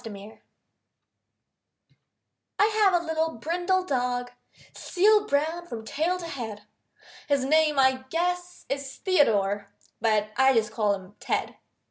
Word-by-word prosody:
TED 205 -1 -10 2.2
I 410 - +5
have 420 -4 +3
a 340 - -8
little 320 0 -1
brindle 355 - 0
dog, 245 -3 -1 0.4
Seal 415 +3 +3
brown 320 +5 -1
from 225 -5 -7
tail 325 +10 -1
to 355 - -7
head. 230 -10 -6 0.6
His 280 -2 +1
name 305 +1 +3
I 260 -1 +3
guess 355 +2 -2
is 275 -1 -4
Theodore, 205 - +1 0.3
But 215 -1 +1
I 265 0 +5
just 215 -2 +1
call 210 -2 +1
him 190 0 -12
Ted. - - -2
280 Hz, 125 wpm, -26 LUFS, 225-345 Hz, 2.2 s, I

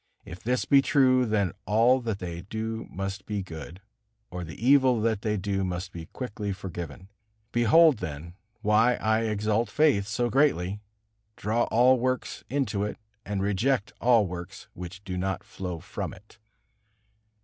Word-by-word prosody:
If 90 - -9
this 125 +2 0
be 140 -1 +6
true, 130 -3 +3
then 100 -4 +1 0.2
all 115 +5 +4
that 110 -4 -2
they 85 -3 -6
do 110 +3 -4
must 95 +1 -5
be 105 -2 -2
good, 85 +1 -9 0.5
or 90 0 -5
the 80 -1 -8
evil 130 -1 +4
that 110 -2 0
they 105 -1 0
do 95 0 -1
must 90 0 -3
be 80 -2 -8
quickly 105 -5 -5
forgiven. 90 -1 -7 0.4
Behold, 130 +5 +5
then, 80 +3 -6 0.3
why 110 +3 +4
I 110 +1 +1
exalt 110 +1 0
faith 140 -8 +3
so 120 +3 0
greatly, 105 - +2 0.6
draw 115 +3 0
all 125 +2 +4
works 130 +1 -2
into 115 -7 0
it, 105 - -3 0.3
and 100 -1 -1
reject 105 +3 0
all 120 -3 +5
works 90 +1 -7
which 90 +2 -9
do 90 -2 -4
not 95 0 -2
flow 90 -3 -6
from 100 - -5
it. 105 +3 -20
105 Hz, 155 wpm, -27 LUFS, 95-120 Hz, 0.6 s, be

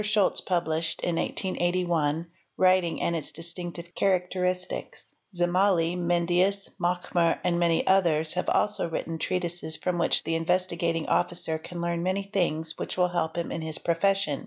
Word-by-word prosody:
Scholz 210 -2 +2
% - - -25
Beenshed 165 -3 0
in 170 -1 0
1881 175 -5 0 0.2
'" - - -43
Writing 185 -2 +3
and 170 - +1
its 155 -3 -4
distinctive 170 +1 -6
hetiuchistiunion 180 -1 -1
" 195 - -28
Zim 175 0 +1
mali, 180 -2 +3
Mendius, 175 +3 +1
Machmer 175 -1 +1
and 175 -1 +1
many 170 -1 +2
others 165 -5 +3
"6 - - +2
4 180 - +1
have - - -3
also 210 -5 -3
written 165 0 -3
ob 160 - -5
treatises 175 -3 -2
from 180 -1 -1
which 170 - +2
the 165 - -2
Investigating 170 -1 0
Officer 165 -2 0
can 170 +2 -7
learn 170 0 -1
many 190 +3 0
things 165 -5 -1
which - - -4
will 180 -1 +3
help 170 -2 -2
him 170 - -2
in 165 - -3
his 160 -1 -3
profession. 170 -3 +1
175 Hz, 175 wpm, -27 LUFS, 165-185 Hz, 0.2 s, Writing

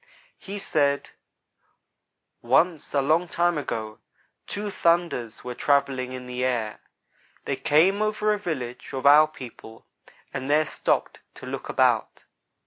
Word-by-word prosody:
He 200 +1 -7
said: 145 -7 0 1.3
"Once, 155 +7 +2
a 140 - +3
long 160 +5 +2
time 175 0 +1
ago, 110 -6 -5 0.5
two 205 0 -4
'thunders' 170 - 0
were 125 - -5
travelling 135 -1 +1
in 130 -1 -7
the 125 0 -4
air. 120 -4 -1 0.7
They - - -1
came 185 +8 +3
over 215 0 +1
a 210 - -3
village 130 -10 -5
of 135 0 -4
our 150 +2 +8
people, 120 -6 -12 0.5
and 130 +2 -4
there 155 +1 +4
stopped - - -1 0.2
to - - -10
look - - -6
about. - - +1
145 Hz, 135 wpm, -25 LUFS, 125-175 Hz, 1.3 s, our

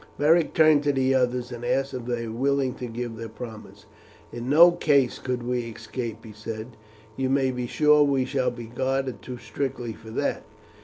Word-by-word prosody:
Beric 160 +3 +3
turned 155 -2 +6
to 145 - +4
the 135 -1 +2
others 125 -1 0
and 120 0 -7
asked 135 +2 0
if 125 -2 -5
they 120 -1 -2
were 110 - -5
willing 135 +1 +1
to 125 - -6
give 120 0 -5
the 115 0 -6
promise. 110 -1 -10 0.5
"In 120 +1 -5
no 170 +5 +8
case 140 -7 +2
could 125 -2 -3
we 125 +1 -1
escape," 115 0 -6
he 110 - -10
said, 110 +2 -7 0.4
"you 130 -1 -1
may 135 -1 +2
be 125 -1 -3
sure 150 +3 +4
we 140 -3 +3
shall 130 -1 0
be 120 -1 -8
guarded 130 +2 -2
too 125 -1 -7
strictly 120 0 -4
for 110 +1 -13
that. 110 - -1
125 Hz, 195 wpm, -25 LUFS, 120-135 Hz, 0.5 s, no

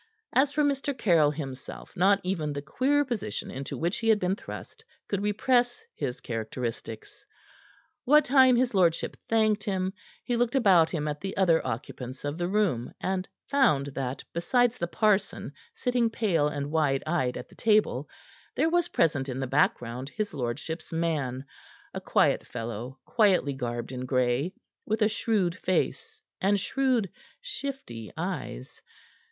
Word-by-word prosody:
As 275 +2 +4
for 300 +1 +1
Mr. 280 -1 0
Caryll 170 -10 +4
himself, 135 -3 -7
not 195 +2 +4
even 165 -5 -1
the 140 - -4
queer 275 - +2
position 215 - -4
into 135 +1 -5
which 170 +4 -1
he 225 - 0
had 220 - +6
been 185 -1 0
thrust - - -9 0.2
could 200 -1 -1
repress 240 +4 +1
his 135 -4 -4
characteristics. 115 -1 -5 0.8
What 300 +3 +5
time 260 -1 +6
his 245 0 +2
lordship 175 -4 +2
thanked 215 -2 +3
him, 190 -2 -1 0.3
he 245 - -1
looked 240 +2 +1
about 185 -10 +5
him 155 -3 -2
at 150 0 -3
the 195 0 -5
other 170 -4 +4
occupants 125 +2 -5
of 145 +3 -3
the 175 - 0
room, 185 - 0
and 190 0 -2 0.2
found 245 - +3
that, 135 -1 -3
besides 245 +8 +2
the 175 - -1
parson, 205 +1 +1 0.2
sitting 245 - +1
pale 185 -10 +1
and 145 -1 -3
wide 145 -4 +1
eyed 155 -6 0
at - - -7
the - - -18
table, 215 -1 +2 0.5
there 325 - +2
was 350 -1 +2
present 140 -4 +1
in 130 0 -3
the 135 - -1
background 125 -1 0
his 215 +4 -3
lordship's 145 +5 -4
man 150 -6 -1 0.5
a - - -4
quiet - - +2
fellow, 120 +2 -5
quietly 195 - +3
garbed 120 -2 -4
in 130 0 -5
gray, 130 +5 +1 0.3
with 220 +1 0
a - - +5
shrewd 210 -5 0
face 445 - -1 0.2
and 200 +1 +3
shrewd, 255 0 +1 0.3
shifty 270 - -6
eyes. - - -5
180 Hz, 155 wpm, -28 LUFS, 135-225 Hz, 0.8 s, had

